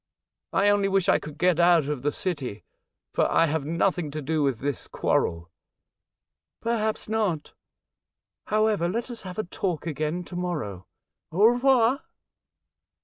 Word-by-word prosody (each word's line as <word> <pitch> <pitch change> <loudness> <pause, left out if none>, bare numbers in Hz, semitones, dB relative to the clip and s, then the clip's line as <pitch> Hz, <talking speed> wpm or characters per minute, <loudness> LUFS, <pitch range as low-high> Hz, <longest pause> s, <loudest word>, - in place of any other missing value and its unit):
I 200 +1 +3
only 205 -1 +3
wish 195 -2 +1
I - - +4
could 150 0 -9
get 180 -2 +2
out 170 -3 +5
of 150 -4 -2
the 145 +2 0
city, 145 - -3 0.5
for - - +2
I 165 - +4
have 155 -2 -1
nothing 170 0 0
to 150 +2 -5
do 155 +2 0
with 135 -4 +1
this 140 +2 -3
quarrel." 85 0 -1 0.5
" - - -64 0.3
Perhaps 220 -2 -1
not. 210 -8 -1 0.9
However, 215 -5 +2
let 235 +6 -3
us 235 - -6
have 185 0 -8
a 215 - 0
talk 175 -3 -3
again 155 +2 -2
to 175 - -10
morrow. 150 - -4 0.4
Au 190 +6 +4
revoir 245 +2 +4
175 Hz, 150 wpm, -26 LUFS, 150-210 Hz, 0.9 s, out